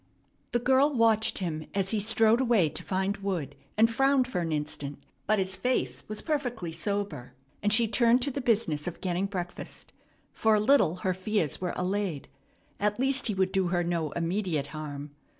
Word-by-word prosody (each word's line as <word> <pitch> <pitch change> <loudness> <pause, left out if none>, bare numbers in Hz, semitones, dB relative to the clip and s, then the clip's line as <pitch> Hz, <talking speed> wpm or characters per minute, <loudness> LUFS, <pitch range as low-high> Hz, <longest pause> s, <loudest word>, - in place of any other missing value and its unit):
The - - +2
girl 265 +4 +3
watched 225 -3 +3
him 160 -4 -2
as 195 -1 0
he 220 - +1
strode 225 +3 +3
away 230 -10 +3
to - - -4
find 190 +2 -1
wood, 175 -9 -3 0.2
and 225 +1 +6
frowned 270 +2 +2
for 180 -8 -2
an 165 -1 -2
instant; 150 -2 -3 0.3
but 215 +1 +3
his 190 -1 0
face 135 - -1
was 215 - -4
perfectly 245 - -2
sober, 175 - -4 0.3
and 205 - +1
she 225 +2 +5
turned 235 +3 +3
to 280 - -1
the 275 - -3
business 200 -11 +1
of 175 - -5
getting 185 +1 -1
breakfast. 180 -3 -6 0.4
For 220 -1 +3
a - - +3
little 210 - +4
her 185 - +2
fears 185 -4 -1
were 180 - -2
allayed. 185 -5 -2 0.5
At 210 +2 0
least, 270 0 +1
he 210 - -1
would 190 0 +1
do 190 -2 +1
her 175 0 +1
no 170 -3 -1
immediate 170 -3 -1
harm. 145 -2 -6
200 Hz, 185 wpm, -28 LUFS, 170-230 Hz, 0.5 s, and